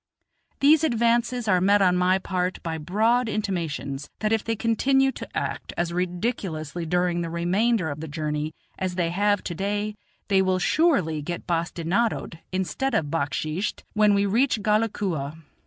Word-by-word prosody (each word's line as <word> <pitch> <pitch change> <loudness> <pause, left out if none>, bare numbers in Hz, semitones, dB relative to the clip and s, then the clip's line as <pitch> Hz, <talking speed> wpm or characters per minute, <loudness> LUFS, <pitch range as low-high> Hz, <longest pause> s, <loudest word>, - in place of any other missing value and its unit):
These 300 +3 +6
advances 235 -2 +1
are 185 -3 +3
met 200 +2 +4
on 180 -2 +4
my 180 +1 +3
part 185 -1 -2
by 165 -2 -3
broad 220 +9 +2
intimations 165 -9 -3
that 215 0 0
if 220 - +1
they 225 - -1
continue 270 +5 +2
to - - -8
act - - -3
as 170 0 -1
ridiculously 175 - -2
during 175 0 +1
the 170 - -3
remainder 185 +4 +1
of 145 - -6
the 160 - -5
journey 150 0 -3 0.2
as 185 -1 -2
they 170 -2 0
have 205 +2 +1
to 175 - -4
day 205 +4 -2 0.3
they 195 -2 +4
will 185 -1 +2
surely 185 - +2
get 170 +3 -5
well 170 -2 +2
bastinadoed, 175 +1 -1
instead 190 +9 -1
of 145 -2 0
backsheeshed, 155 +4 -2
when 210 -1 +4
we 200 0 +2
reach 225 +1 +2
Ghalakua. 200 -9 0
185 Hz, 160 wpm, -25 LUFS, 170-220 Hz, 0.3 s, These